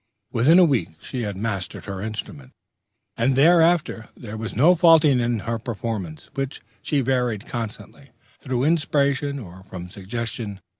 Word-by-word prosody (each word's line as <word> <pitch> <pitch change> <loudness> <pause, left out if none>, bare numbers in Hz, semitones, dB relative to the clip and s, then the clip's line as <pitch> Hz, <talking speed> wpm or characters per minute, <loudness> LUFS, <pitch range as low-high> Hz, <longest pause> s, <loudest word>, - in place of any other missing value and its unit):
Within 140 +9 +5
a 185 - +8
week 110 - 0
she 125 +7 -5
had 105 -4 -4
mastered 100 -3 -4
her 95 -2 -5
instrument; 105 -11 -7 0.6
and 135 - +1
thereafter 165 -5 +3
there 110 -2 -8
was 110 +1 -5
no 160 +8 +6
faltering 160 -6 +5
in 120 -2 0
her 115 +1 -3
performances, 105 -8 -5
which 135 0 -4 0.2
she 145 -2 0
varied 125 -5 0
constantly, 120 +4 -7 0.3
through 130 -2 -2
inspiration 145 -2 +1
or 95 -6 -10
from 90 -2 -8
suggestion.... 105 +2 -5
120 Hz, 145 wpm, -23 LUFS, 105-140 Hz, 0.6 s, a